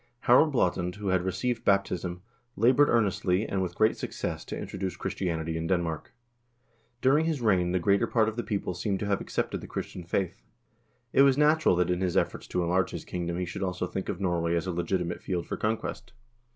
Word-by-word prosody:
1 - - -37 0.2
Harald 130 +5 +6
Blaatand, 90 -7 0
who 105 -1 -3
had 95 -1 +2
received 115 +6 -2
baptism, 90 -3 0 0.3
labored 130 +6 +4
earnestly, 100 -3 +2
and 95 - -1
with 90 -2 -3
great 110 0 +3
success, - - -4
to - - -6
introduce 95 -1 -4
Christianity 80 -3 -2
in 80 0 -3
Denmark. 85 -4 -1 0.9
Dur 135 +3 +4
ing 160 - +1
his 160 -3 0
reign 95 -7 +2
the 90 - +2
greater 100 +3 +2
part 110 -2 +2
of 110 - -2
the 120 - -1
people 100 -5 -2
seem 95 +3 -1
to 105 - -3
have 100 -1 0
accepted - - -2
the - - -9
Christian 90 - -5
faith. 85 -3 -2 0.7
It - - +6
was 140 -1 +5
natural 150 - +4
that 90 0 +1
in 90 +1 -1
his 90 -2 0
efforts - - -1
to 90 - -1
enlarge 90 +2 +1
his - - -7
kingdom 85 -1 -3
he 90 - -1
should 85 - -6
also 90 -1 -1
think 95 +1 -4
of 90 - -3
Norway 85 -3 0
as 85 - -1
a 95 - -2
legitimate 85 0 -2
field 90 -2 -2
for - - -4
conquest. 110 +2 -3
95 Hz, 210 wpm, -28 LUFS, 90-110 Hz, 0.9 s, Harald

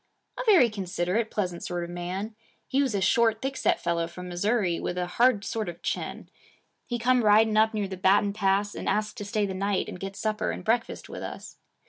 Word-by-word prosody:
'A - - -1
very 370 - +7
considerate, 195 +1 -2
pleasant 180 -4 -3
sort 175 -1 -3
of 170 - -6
man. 185 +5 -4 0.3
He 275 - +2
was 260 -6 0
a 195 - 0
short, 225 +3 +3
thick 270 +2 -3
set - - +1
fellow 170 -1 -1
from 180 +2 -9
Missouri, 185 0 0
with 180 - -3
a 180 - 0
hard 215 +2 +2
sort 220 -3 -2
of 170 - -10
chin. - - -3 0.6
He 240 - -2
come 245 +1 +2
riding 215 +1 +5
up 220 +1 +4
near 205 -2 -1
the 190 -1 -6
Baton 200 +2 +3
Pass, 200 0 +1
and - - -3
asked 215 0 -1
to 205 - -5
stay 210 0 0
the 195 - -4
night 195 +1 -1
and - - -7
get 195 +1 -6
supper 215 0 -1
and - - -5
breakfast 230 +1 0
with - - -8
us. - - -8
205 Hz, 215 wpm, -27 LUFS, 180-220 Hz, 0.6 s, very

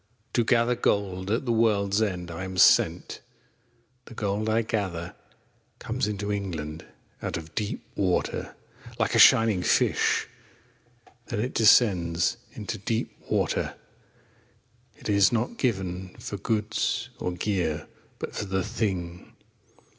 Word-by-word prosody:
To 120 - +3
gather 120 +1 +3
Gold 95 -5 0
At 115 +5 0
the 120 - 0
world's 105 -3 +2
end 90 -5 -2
I 85 +2 -5
am 95 0 -6
sent. - - +4 0.8
The 120 - -12
Gold 105 +1 -1
I 115 +1 +2
gather 95 -6 -3 0.6
Comes - - -2
into 100 -1 -3
England 80 -6 -4 0.4
Out - - -3
of 80 -1 -9
deep 105 -2 -3
Water. 95 -3 -1 0.4
Like - - 0
a - - +3
shining 110 -5 +6
Fish - - +2 1.0
Then - - -3
it 125 +4 -2
descends 95 -4 +4 0.2
Into 110 0 -5
deep 110 +3 -2
Water. - - 0 1.2
It - - -9
is 100 -2 +4
not 120 - -1
given 95 -6 -2
For 100 - -6
goods 110 +1 -1
or 90 - -2
gear, 90 -4 -1 0.3
But - - -6
for 105 - -3
The 95 -1 -1
Thing. 95 -6 -3
100 Hz, 130 wpm, -26 LUFS, 90-110 Hz, 1.2 s, shining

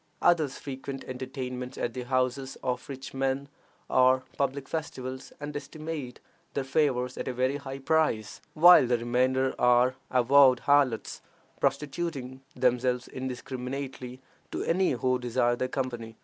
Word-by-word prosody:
Others 160 -6 +3
frequent 135 0 -6
entertainments 125 -1 -6
at 120 - -2
the 125 - -4
houses 130 +1 -1
of 125 0 -2
rich 135 -1 -7
men, 135 +1 -1 0.4
or 130 0 +4
public 140 0 -1
festivals, 130 -5 -5
and 145 0 -6
estimate 145 -2 -6 0.4
their 140 - 0
favors 130 -3 0
at - - -4
a 130 - -1
very 130 +3 0
high 135 -1 -7
price, 135 -8 0
while 170 -4 +8
the 120 0 +2
remainder 130 +3 +1
are 125 +1 +4 0.2
avowed 130 0 +5
harlots, 140 -5 +2 0.4
prostituting 140 -1 -2
themselves 125 0 +1
indiscriminately 130 0 -5 0.3
to - - -3
any 185 0 +2
who 130 +1 +1
desire 120 0 +1
their 130 - -1
company. 120 -4 -4
130 Hz, 135 wpm, -28 LUFS, 125-140 Hz, 0.4 s, while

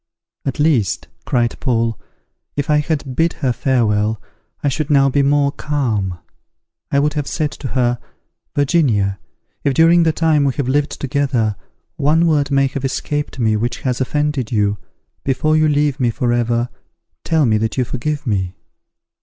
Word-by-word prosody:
"At 140 +2 -3
least," 140 - +1 0.2
cried 120 -1 0
Paul, 115 -4 0 0.6
"if 145 +1 -1
I 150 - +4
had 150 -3 -2
bid 165 +3 +2
her 130 -4 -1
farewell, 110 -4 +1 0.4
I - - +2
should 140 +2 -1
now 135 -2 +4
be 140 +1 +2
more 140 0 +3
calm. 115 - -1 0.7
I - - +1
would 145 +1 +2
have 145 -2 -2
said 150 -2 -1
to 140 - -6
her, 120 -1 +2 0.6
'Virginia, 125 - +2 0.4
if, 140 -2 +1
during 165 +3 +6
the 165 -1 +3
time 155 -2 +2
we 135 -2 +1
have 140 -4 -2
lived 145 +2 0
together, 130 -6 0 0.4
one 155 +4 +3
word 150 -4 +2
may 140 -1 +3
have 135 0 -3
escaped 145 +2 -2
me 110 -3 +2
which 120 +3 -2
has 125 -1 -1
offended 145 -2 -1
you, 105 -3 +1 0.4
before 145 +4 +1
you 155 0 +4
leave 145 -1 +1
me 125 -2 +2
forever, 120 -1 0 0.5
tell 160 -3 +2
me 110 -3 +2
that 110 +3 -2
you 130 - +3
forgive 145 +5 -3
me.' 95 -5 -1
135 Hz, 160 wpm, -18 LUFS, 120-150 Hz, 0.7 s, during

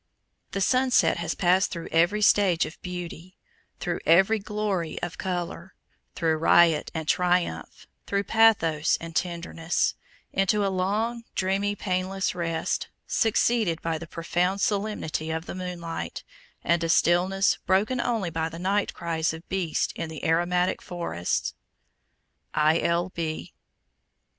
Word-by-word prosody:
The 195 - -1
sunset 255 +3 +3
has 170 -1 -2
passed 185 +3 +3
through 170 -1 -6
every 175 +6 +3
stage 190 -5 +4
of 155 - -10
beauty, 180 0 -7 0.4
through 175 -1 -2
every 190 +7 +5
glory 200 -5 -2
of 175 -3 -4
color, 175 0 -4 0.4
through 160 -2 +1
riot 165 -1 +4
and 160 -1 -3
triumph, 180 +1 0 0.2
through 200 0 0
pathos 200 -9 +3
and 165 -1 -8
tenderness, 170 -1 -1 0.4
into 200 +2 +2
a 195 - 0
long, 220 +6 -1
dreamy, 195 +2 0
painless 185 0 -1
rest, 165 -2 -2 0.2
succeeded 225 -5 +1
by 165 -1 -1
the 170 - -8
profound 175 +4 -1
solemnity 200 -7 -1
of 160 +1 -3
the - - -6
moonlight, 180 -3 -5 0.4
and 170 0 +2
a 165 - -1
stillness 185 +4 +3
broken 215 +7 +2
only 225 -9 -1
by 160 0 -1
the 165 - -9
night 195 +4 0
cries 165 -2 -1
of 160 +1 -10
beasts 185 -4 -1
in 165 - -4
the 160 -2 -7
aromatic 175 +2 +1
forests. 170 - -2 1.0
I. 155 +2 +4
L. 170 +2 +1
B. 160 -3 -4
180 Hz, 135 wpm, -26 LUFS, 165-195 Hz, 1.0 s, every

